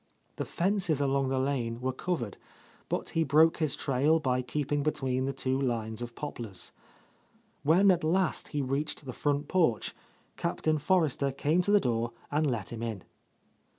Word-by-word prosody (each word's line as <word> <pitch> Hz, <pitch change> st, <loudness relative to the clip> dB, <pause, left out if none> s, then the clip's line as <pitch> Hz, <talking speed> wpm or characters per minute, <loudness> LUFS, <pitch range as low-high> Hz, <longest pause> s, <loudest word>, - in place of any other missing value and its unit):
The -, -, -2 dB
fences 180 Hz, -5 st, +1 dB
along 135 Hz, -1 st, +1 dB
the 135 Hz, -, 0 dB
lane 130 Hz, -4 st, -1 dB
were 130 Hz, +1 st, -1 dB
covered, 130 Hz, -, -3 dB, 0.5 s
but -, -, -2 dB
he 165 Hz, -, +1 dB
broke 155 Hz, +3 st, +5 dB
his 155 Hz, -4 st, +1 dB
trail 145 Hz, +4 st, +2 dB
by 125 Hz, -4 st, +1 dB
keeping 145 Hz, +3 st, -1 dB
be 155 Hz, -, +2 dB
tween 130 Hz, -3 st, -1 dB
the 135 Hz, -, 0 dB
two 135 Hz, 0 st, -1 dB
lines 115 Hz, -3 st, -1 dB
of 120 Hz, -1 st, -6 dB
poplars. 115 Hz, -10 st, -5 dB, 0.9 s
When 185 Hz, +7 st, +5 dB
at 175 Hz, -3 st, +1 dB
last 180 Hz, +3 st, +1 dB
he 145 Hz, -2 st, -2 dB
reached 140 Hz, +3 st, -1 dB
the 130 Hz, -, -5 dB
front 145 Hz, +2 st, 0 dB
porch. 160 Hz, -, +1 dB, 0.4 s
Captain 155 Hz, -1 st, 0 dB
Forrester 150 Hz, -4 st, +2 dB
came 150 Hz, +6 st, +1 dB
to 200 Hz, -, 0 dB
the 205 Hz, -, +6 dB
door 115 Hz, -5 st, -1 dB, 0.2 s
and 150 Hz, 0 st, +2 dB
let 115 Hz, -4 st, -3 dB
him 115 Hz, -, -6 dB
in. 110 Hz, -5 st, -4 dB
140 Hz, 170 wpm, -30 LUFS, 125-155 Hz, 0.9 s, the